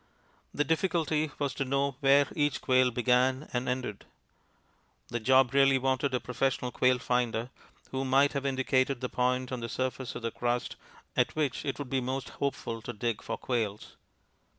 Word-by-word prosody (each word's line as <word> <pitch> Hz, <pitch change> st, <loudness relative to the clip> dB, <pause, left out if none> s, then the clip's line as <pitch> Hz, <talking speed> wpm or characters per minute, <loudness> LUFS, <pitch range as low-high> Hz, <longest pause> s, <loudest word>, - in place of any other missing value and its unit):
The 145 Hz, -, 0 dB
difficulty 160 Hz, -2 st, 0 dB
was 140 Hz, -2 st, -1 dB
to 140 Hz, -, -2 dB
know 140 Hz, +1 st, 0 dB
where 140 Hz, 0 st, +5 dB
each 145 Hz, -2 st, +1 dB
quail 130 Hz, 0 st, +3 dB
began 125 Hz, +3 st, +2 dB
and 125 Hz, 0 st, -1 dB
ended; 125 Hz, -5 st, -3 dB, 1.1 s
the 120 Hz, -, -2 dB
job 130 Hz, +2 st, +4 dB
really 135 Hz, -1 st, +5 dB
wanted 130 Hz, +1 st, 0 dB
a -, -, +1 dB
professional 125 Hz, 0 st, -1 dB
quail 125 Hz, 0 st, +3 dB
finder, 125 Hz, -1 st, -1 dB, 0.4 s
who 135 Hz, 0 st, -2 dB
might 135 Hz, +2 st, +3 dB
have 140 Hz, -1 st, -2 dB
indicated 130 Hz, 0 st, +1 dB
the 125 Hz, -, -3 dB
point 125 Hz, 0 st, 0 dB
on 130 Hz, -, -3 dB
the 115 Hz, 0 st, -5 dB
surface 130 Hz, 0 st, -3 dB
of -, -, -6 dB
the 115 Hz, -, -1 dB
crust 120 Hz, 0 st, -2 dB, 0.4 s
at -, -, +1 dB
which 150 Hz, -5 st, -1 dB
it 140 Hz, -, -2 dB
would 140 Hz, -3 st, -6 dB
be 135 Hz, -1 st, +1 dB
most 130 Hz, +1 st, -3 dB
hopeful 115 Hz, -5 st, -3 dB
to 120 Hz, -, -6 dB
dig 115 Hz, 0 st, -2 dB
for -, -, -4 dB
quails. 110 Hz, -5 st, -3 dB
130 Hz, 175 wpm, -29 LUFS, 125-135 Hz, 1.1 s, where